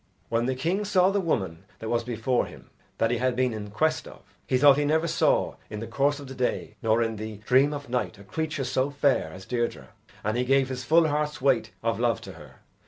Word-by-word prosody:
When 115 +1 +1
the 130 - 0
king 170 +10 0
saw 190 -2 +3
the 200 0 +1
woman 95 - -2
that 110 - -7
was 120 +1 0
before 120 +1 0
him - - -14 0.3
that 115 - +2
he 120 - 0
had 130 0 +1
been 125 -1 +1
in 105 -1 -6
quest 155 +10 0
of, - - -12 0.3
he 130 - +2
thought 140 +1 +6
he - - +2
never 160 +3 +2
saw - - +1
in 105 - -5
the 115 - -5
course 140 +5 +1
of 140 - -8
the 130 - -8
day 130 -1 -2
nor 115 0 +3
in 115 -1 -3
the 110 0 -6
dream 130 +4 +4
of 145 -1 -6
night 125 -3 -2
a 100 - -13
creature 155 +5 -3
so 130 +2 0
fair 140 - +1
as 95 +3 -10
Deirdre 120 -1 -2 0.3
and 110 +2 0
he 125 - +2
gave 135 +1 +3
his 130 -1 -4
full 160 +5 +4
heart's 150 0 -1
weight 135 -2 +2
of - - 0
love - - +1
to - - -9
her. - - -14
130 Hz, 240 wpm, -26 LUFS, 115-145 Hz, 0.3 s, thought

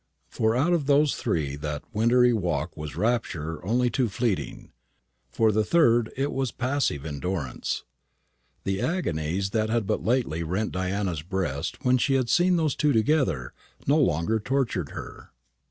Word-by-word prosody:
For 110 0 +1
two - - +1
out 170 +6 +3
of 155 -5 0
those 145 0 +4
three 70 -4 -1
that 75 0 -4
wintry 120 +3 +4
walk 85 -10 -1
was 75 -1 -7
rapture 90 -10 -1
only 120 +5 +1
too 125 -1 +1
fleeting. 110 -1 -2 0.6
For 110 - +2
the 110 +1 +2
third 120 -7 +3
it 140 +2 0
was 135 -3 -1
passive 125 - -1
endurance. 75 -2 -3 0.8
The 95 0 -1
agonies 95 - -1
that 110 0 0
had 115 -2 +1
but - - -1
lately 115 -9 0
rent 95 +6 -2
Diana's 95 -3 -2
breast 85 -5 -3
when 125 0 +4
she 135 +2 +2
had 130 -3 +1
seen 180 +4 +4
those 160 -4 +1
two 150 -1 +2
together 110 - +1 0.3
no 145 +3 +3
longer 110 - +1
tortured 115 - -1
her. - - -9
110 Hz, 155 wpm, -26 LUFS, 85-130 Hz, 0.8 s, those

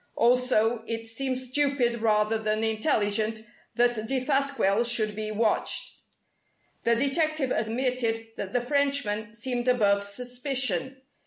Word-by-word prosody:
Also, 235 -2 +2
it 230 0 -4
seemed 255 +3 -3
stupid 255 -2 0
rather 215 0 +2
than 215 0 -1
intelligent 220 -1 0 0.3
that 240 0 +3
Defasquelle 270 -5 +1
should 220 -3 +2
be 215 0 -3
watched. 215 0 +1 0.9
The 235 - +4
detective 280 +2 0
admitted 230 0 -1
that 195 - -5
the 245 - 0
Frenchman 245 -6 0
seemed 245 +1 -3
above 205 -5 +3
suspicion. 250 - -3
235 Hz, 110 wpm, -27 LUFS, 220-260 Hz, 0.9 s, The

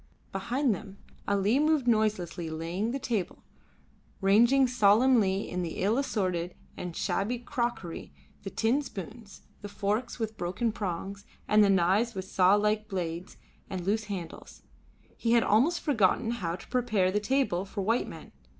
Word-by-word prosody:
Behind 240 +6 0
them 200 0 -9 0.3
Ali 200 +5 +2
moved 305 -4 +2
noiselessly 205 -7 0
laying 165 +7 -3
the 260 - -2
table, 235 -8 -3 0.8
ranging 235 +7 +5
solemnly 215 -4 +3
the 175 -3 -3
ill 210 +4 +2
assorted 185 -9 -1 0.2
and 175 -2 -6
shabby 220 +5 -1
crockery, 235 -7 -4 0.3
the 195 - -6
tin 230 +8 +1
spoons, 220 - -9 0.2
the 205 - -7
forks 210 +4 -2
with 220 -2 -4
broken 185 +7 -1
prongs, 200 -1 -5 0.2
and 210 0 +5
the 200 - +4
knives 195 +5 +2
with 190 -1 -4
saw 190 +1 +4
like 210 +1 +1
blades 175 -2 -4 0.3
and 185 -2 -4
loose 210 +2 0
handles. 185 -6 -8 0.5
He 230 0 +1
had 235 -1 +5
almost 255 +12 +3
forgotten 225 - +2
how 175 -8 -2
to 175 - -12
prepare 220 -7 +1
the 210 - +1
table 210 -5 0
for 200 +1 -5
white 230 +5 +1
men. - - -10
210 Hz, 150 wpm, -29 LUFS, 190-235 Hz, 0.8 s, ranging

